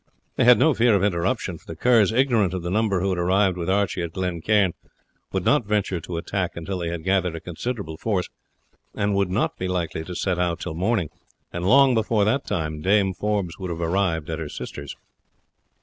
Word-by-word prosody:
They - - +2
had 125 0 +8
no 160 - +4
fear 115 -2 +3
of 95 - +1
interruption, 90 -1 -1
for - - -26
the 80 - -6
Kerrs, 110 +2 +4
ignorant 115 -7 +2
of 90 - -4
the 85 - -3
number 105 -3 +1
who 95 - 0
had 90 - -1
arrived 95 +1 +2
with 85 0 -4
Archie 100 -1 +1
at 85 -1 -4
Glen 90 -3 -3
Cairn, 100 -2 +2 0.6
would 95 -2 -2
not 135 -7 +3
venture 100 -4 0
to 85 +1 -6
attack 90 +1 -3
until 90 +3 -4
they 85 -1 -2
had 85 -1 -5
gathered 95 -2 +1
a - - -5
considerable 90 -1 -5
force, 95 -1 -1 0.7
and 100 0 0
would 100 -1 +1
not 95 +4 -1
be 95 - -2
likely 85 -3 -2
to 90 - -7
set 90 0 -1
out 85 -2 0
till - - -5
morning, 90 -1 0 0.4
and 85 +1 -2
long 135 0 +6
before 110 -2 +2
that 130 +6 0
time 80 -2 -2
Dame 95 +1 +2
Forbes 100 -2 -2
would 95 -2 -4
have 85 -1 -4
arrived 85 -2 0
at 80 - -3
her 80 -2 -5
sister's. 70 -1 -7
95 Hz, 210 wpm, -24 LUFS, 85-105 Hz, 0.7 s, had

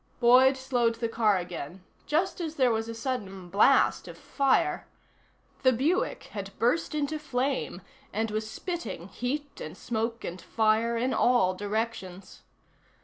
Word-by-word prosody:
Boyd 255 +2 +6
slowed 245 -3 +1
the 230 0 -2
car 220 -3 +2
again, 175 0 -6 0.2
just 345 +5 0
as 320 -2 -4
there 255 -4 +3
was 225 0 -1
a 230 - -5
sudden 205 -7 -4
blast 210 +8 +4
of - - -9
fire. 275 -2 +1 0.7
The 260 - +5
Buick 285 +10 0
had 195 -1 -7
burst 275 +6 +1
into 300 +1 -1
flame 265 -8 -2 0.3
and 220 +2 -1
was 215 0 -3
spitting 345 - -5
heat 285 +6 -4
and 155 +4 -8
smoke 230 0 -3
and 175 +1 -6
fire 225 +1 +1
in 250 +3 0
all 240 -7 +3
directions. 205 -2 -4
230 Hz, 145 wpm, -28 LUFS, 205-265 Hz, 0.7 s, Boyd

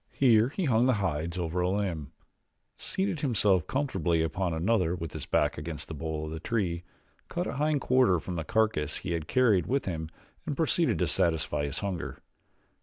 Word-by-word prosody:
Here 120 -3 +4
he 180 +5 -2
hung 120 -2 +3
the 130 - +4
hides 85 -3 -2
over 85 0 -2
a 90 - +1
limb, 90 -8 -2 0.6
seated 190 -4 -2
himself 105 - +2
comfortably 90 - 0
upon 90 +2 -1
another 90 +1 +1
with 80 -3 -6
his - - -6
back - - +1
against 75 0 -6
the - - -6
bole 80 0 -3
of 75 - -6
the 80 - -5
tree, 90 -4 -1 0.5
cut 175 +1 -2
a - - -3
hind 150 -1 +1
quarter 125 -10 +4
from 90 +2 -5
the 80 - -2
carcass 105 -7 +1
he 90 - -5
had 80 -2 -2
carried 115 -9 +3
with 135 +1 0
him 80 -4 -3 0.4
and - - -2
proceeded - - +2
to - - +1
satisfy 80 -3 +1
his 70 0 -4
hunger. 95 -5 -3
90 Hz, 185 wpm, -29 LUFS, 80-115 Hz, 0.6 s, Here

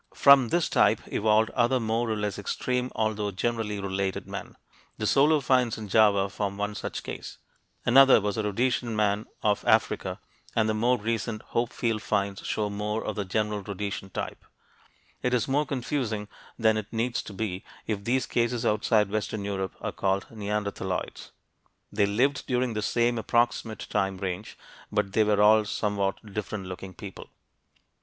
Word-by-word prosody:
From 140 -3 +7
this 170 +7 +1
type - - +3
evolved 110 +1 +3
other 125 +1 +2
more 115 +1 0
or 110 - 0
less 105 -1 -2
extreme 125 +5 -2
although 110 -2 0
generally 105 +1 -2
related 95 -1 -2
men. - - -7 0.4
The 110 - -2
Solo 145 +6 +4
finds 125 -3 +2
in 105 -2 -7
Java 100 -2 +4
form 100 0 -3
one 105 +1 -2
such 105 - -5
case. - - -7 0.5
Another 135 +1 +7
was 105 0 -1
the 110 - -1
Rhodesian 115 +2 0
man 105 0 +1 0.2
of 105 -1 +2
Africa, - - +2 0.4
and 110 -1 +3
the 110 - +1
more 120 +4 +2
recent 115 0 -2
Hopefield 115 -2 0
finds 100 -2 -1
show 105 -1 0
more 105 +2 -2
of - - -3
the 100 - -2
general 105 +2 -1
Rhodesian 100 -1 -5
type. - - -5 0.8
It 125 0 +1
is 115 - 0
more 145 +3 +1
confusing 125 -6 -2 0.3
than 110 -2 +3
it 110 -1 -5
needs 120 +2 -1
to - - -10
be 95 -2 -3 0.2
if 105 -3 -3
these 130 +4 +1
cases 120 0 0
outside 105 -1 +2
western 105 -1 -2
Europe 95 -2 -3
are - - -2
called 95 0 0
neanderthaloids. 100 -4 -3 0.6
They 100 -1 +2
lived 130 +8 +1
during 125 -1 0
the 105 - -2
same 120 +2 +1
approximate 115 0 0
time 95 -1 0
range 95 +2 -5 0.3
but 105 -2 0
they 110 - +4
were 105 -1 +3
all 110 +1 +6
somewhat 100 0 -2
different 105 -1 -4
looking 95 0 -8
people. 100 0 -9
110 Hz, 165 wpm, -27 LUFS, 100-120 Hz, 0.8 s, From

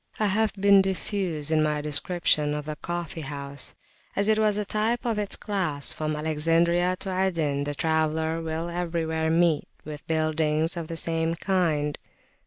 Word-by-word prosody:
I 215 - +2
have 210 +2 +2
been 200 0 +5
diffuse 185 -5 -1
in 155 -1 +4
my 150 -1 +1
description 150 0 +1
of 150 -1 -4
the 155 0 -4
coffee 170 +1 -5
house, 140 -1 -5 0.4
as 200 +1 +1
it 220 0 +3
was 210 -1 +3
a 210 - -1
type 220 +4 0
of 225 -3 0
its 205 -1 0
class: 175 -9 -2
from 155 0 -2
Alexandria 165 +4 +2
to 190 -2 -2
Aden 160 -7 0
the 145 0 -3
traveller 160 +1 0
will 160 +1 -3
everywhere 165 -2 -1
meet 165 -1 +2 0.2
with 150 -1 -8
buildings 155 +1 +1
of 170 -2 -4
the 165 - -5
same 165 0 0
kind. 165 -6 0
165 Hz, 165 wpm, -26 LUFS, 155-185 Hz, 0.4 s, been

